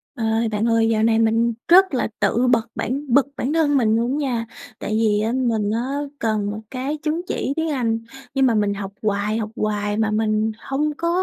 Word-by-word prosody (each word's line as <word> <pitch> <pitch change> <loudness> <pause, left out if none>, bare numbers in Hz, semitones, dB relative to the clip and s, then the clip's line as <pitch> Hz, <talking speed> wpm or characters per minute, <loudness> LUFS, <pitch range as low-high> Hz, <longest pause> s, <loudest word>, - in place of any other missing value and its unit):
Ơi, 225 0 0
bạn 210 +1 -1
ơi, 230 -1 +3
dạo 220 -1 +1
này 225 0 +3
mình 225 +1 +2
rất 375 -2 +6
là 250 - +1
tự 225 +5 +2
bật 235 -2 +2
bản 275 +4 -3
bực 275 +1 +5
bản 270 +5 -1
thân 300 -3 +3
mình 220 -4 +3
luôn 235 +2 0
á, 280 - -1
nha. 230 -2 -2 0.3
Tại - - -4
vì 215 -1 +2
á, 220 - 0
mình 230 -5 0
á, 255 +5 -2 0.2
cần 215 -2 0
một 210 - -5
cái 270 +4 -3
chứng 310 +3 -2
chỉ 275 - -2
tiếng 320 0 -1
Anh, 230 -5 0 0.3
nhưng 270 -1 +3
mà 235 - +3
mình 205 -1 +1
học 195 -1 -6
hoài, 210 0 0
học 220 -1 -3
hoài 210 -2 -1
mà 220 -1 +1
mình 215 0 +1
hông 285 +5 -1
có 335 - -1
230 Hz, 220 wpm, -21 LUFS, 215-265 Hz, 0.3 s, rất